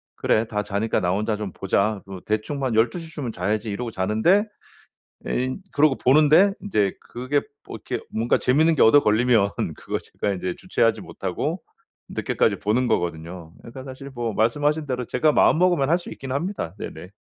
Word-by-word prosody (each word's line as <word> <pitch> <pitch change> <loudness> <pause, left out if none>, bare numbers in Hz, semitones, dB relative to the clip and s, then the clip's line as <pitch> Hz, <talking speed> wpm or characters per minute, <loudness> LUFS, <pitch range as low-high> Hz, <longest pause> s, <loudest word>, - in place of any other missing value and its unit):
그래 110 - +1
다 105 -2 -2
자니까 105 +3 -1
나 90 0 +1
혼자 105 +3 -1
좀 105 -3 -5
보자. 100 +2 0
뭐 95 -1 -8
대충 110 +7 -2
뭐 135 - 0
한 115 - -2
12:00 120 +10 +1
쯤은 130 -6 -4
자야지.' 105 +4 -2
이러고 115 +4 -4
자는데, 110 - +2 0.8
예 125 - 0
인 130 +9 -5
그러고 145 -1 +4
보는데 155 +9 +5
인제 105 - 0
그게 130 +4 -2 0.3
뭐 - - -7
이렇게 - - -3
뭔가 115 +2 +1
재미있는 155 +6 +3
게 - - +1
얻어 130 +6 +7
걸리면 110 -2 +3 0.3
그거 - - -4
제가 100 - -3
인제 90 -1 -3
주체하지 115 -11 +1
못하고 - - -4 0.5
늦게까지 - - 0
보는 120 +5 +1
거거든요. 85 -4 -3
그러니까 130 +3 -10
사실 135 +1 -9
뭐 120 -3 -3
말씀하신 145 +8 +1
대로 125 -2 -2
제가 150 +7 +2
마음 - - +4
먹으면 175 -7 +3
할 170 - +5
수 175 - -10
있긴 135 -1 -7
합니다. 155 - -3
네네. 85 +4 -8
120 Hz, 375 characters per minute, -23 LUFS, 105-145 Hz, 0.8 s, 얻어